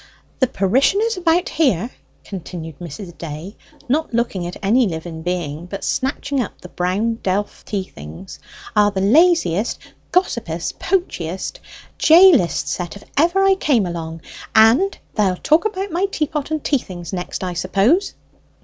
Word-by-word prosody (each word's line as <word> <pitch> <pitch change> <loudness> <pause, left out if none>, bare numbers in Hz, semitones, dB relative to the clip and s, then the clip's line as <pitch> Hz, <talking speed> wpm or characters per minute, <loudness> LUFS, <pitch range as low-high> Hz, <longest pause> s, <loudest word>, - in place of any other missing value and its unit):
"The 260 - +4
parishioners 275 - +2
about 350 0 +2
here," 250 - +1 0.3
continued 165 -5 -8
Mrs. 175 +1 -8
Day, 165 +5 -7 0.3
not 290 -1 0
looking 200 -7 -1
at 175 - -7
any 230 +4 +4
living 160 -1 -5
being, 170 -2 -3
but 195 +2 -6
snatching 275 0 -1
up 225 - -6
the 180 - -11
brown 200 +7 -1
delf 195 +2 -2
tea 200 -2 -2
things, 75 - -11 0.4
"are 210 0 +5
the 200 -2 -3
laziest, 230 - +3 0.3
gossipest, 220 - -1
poachest, 190 - -2 0.4
jailest 320 - +6
set 175 -1 -3
of 200 - -11
any - - -25
ever 345 +6 +3
I 390 0 +5
came 275 - +2
among. 165 -2 -5 0.3
And 230 - +5 0.2
they'll 195 -4 +1
talk 310 - +2
about 395 -2 -2
my 360 +4 +1
teapot 305 -5 -2
and 310 -2 -2
tea 280 - +2
things 175 -4 -9
next, 180 +1 -4
I 180 -1 -2
suppose!" 200 - +1
205 Hz, 150 wpm, -20 LUFS, -, 0.4 s, jailest